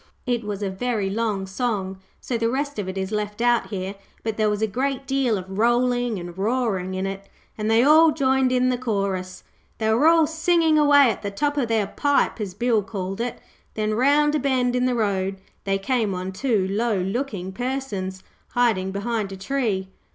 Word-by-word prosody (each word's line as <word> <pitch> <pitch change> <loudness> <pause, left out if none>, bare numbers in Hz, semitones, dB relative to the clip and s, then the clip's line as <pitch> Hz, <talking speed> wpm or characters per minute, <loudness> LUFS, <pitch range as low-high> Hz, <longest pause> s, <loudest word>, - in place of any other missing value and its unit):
It 240 -2 0
was 210 -1 -4
a 195 - -1
very 205 -1 -1
long 210 -2 -1
song, 190 -2 -2 0.2
so 250 - -4
the 230 0 +1
rest 280 0 -2
of 190 -2 -3
it 190 - -5
is 190 +1 -3
left 210 0 -3
out 240 0 +2
here, 190 -1 -4 0.3
but 225 -1 -2
there 215 -1 +2
was 210 +1 -1
a - - +5
great 265 +5 -2
deal 265 -5 +1
of 190 +1 -6
rolling 245 0 +2
and 175 -1 -7
roaring 195 -3 -1
in 190 +1 -2
it, 195 0 -6 0.3
and 215 0 -2
they 225 +2 +5
all 315 +3 +7
joined 265 -3 +2
in 255 0 +2
the 250 -1 0
chorus. 195 -6 -2 0.3
They 220 -1 +1
were 265 +8 +4
all 330 -1 +6
singing 320 0 +2
away 285 -4 +6
at 205 - -6
the 200 - -3
top 290 +9 -1
of 275 -5 0
their 225 -2 +1
pipe, 280 +2 0
as 190 -3 -4
Bill 230 0 +2
called 195 -1 -5
it, 245 0 -3 0.4
when 215 0 0
round 290 +5 +3
a 305 - +2
bend 255 -3 +1
in 250 0 +2
the 250 -1 +1
road 195 -3 -1 0.3
they 195 0 +1
came 210 -1 0
on 185 +1 -4
two 205 -2 0
low 220 +1 +1
looking 195 -1 -3
persons 205 -6 -4 0.3
hiding 225 -6 +2
behind 200 +1 -2
a 195 - -7
tree. 200 -3 -1
225 Hz, 200 wpm, -23 LUFS, 195-255 Hz, 0.4 s, all